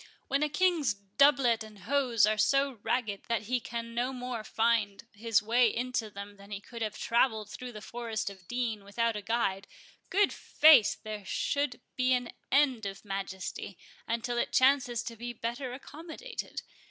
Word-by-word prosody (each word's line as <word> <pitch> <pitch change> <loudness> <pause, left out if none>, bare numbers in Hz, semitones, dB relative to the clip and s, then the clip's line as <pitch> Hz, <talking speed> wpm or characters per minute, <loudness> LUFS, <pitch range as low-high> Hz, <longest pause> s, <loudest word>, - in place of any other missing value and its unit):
—"When 275 +1 +1
a 300 - +2
King's 335 - +2
doublet 235 +3 +3
and 215 -1 -12
hose 245 -1 +3
are 215 0 +2
so 275 +1 +2
ragged 225 -3 -1
that 230 -2 0
he 250 +4 0
can 230 0 -6
no 245 +2 0
more 250 -3 -5
find 225 -2 +1
his 220 0 +1
way 235 +3 +4
into 240 -1 -2
them 200 0 -9
than 200 0 -14
he 200 -1 -4
could 235 +3 -10
have 215 -2 -2
travelled 220 -3 +1
through 250 0 -7
the 210 -1 -9
forest 230 -2 -4
of 190 -3 -7
Deane 235 -4 -2
without 230 +3 0
a 210 - -3
guide, 200 -3 -1 0.4
good 400 +1 +3
faith, 300 -9 +6
there 215 -2 -5
should 250 +5 -1
be 255 0 +3
an 245 -2 -1 0.2
end 260 -6 +3
of 195 +2 -8
Majesty, 195 -1 -5 0.3
until 235 +1 -1
it - - -1
chances 255 -3 +3
to 230 - -6
be 240 +2 -6
better 240 +3 -4
accommodated. 320 - -7
235 Hz, 170 wpm, -30 LUFS, 210-255 Hz, 0.4 s, faith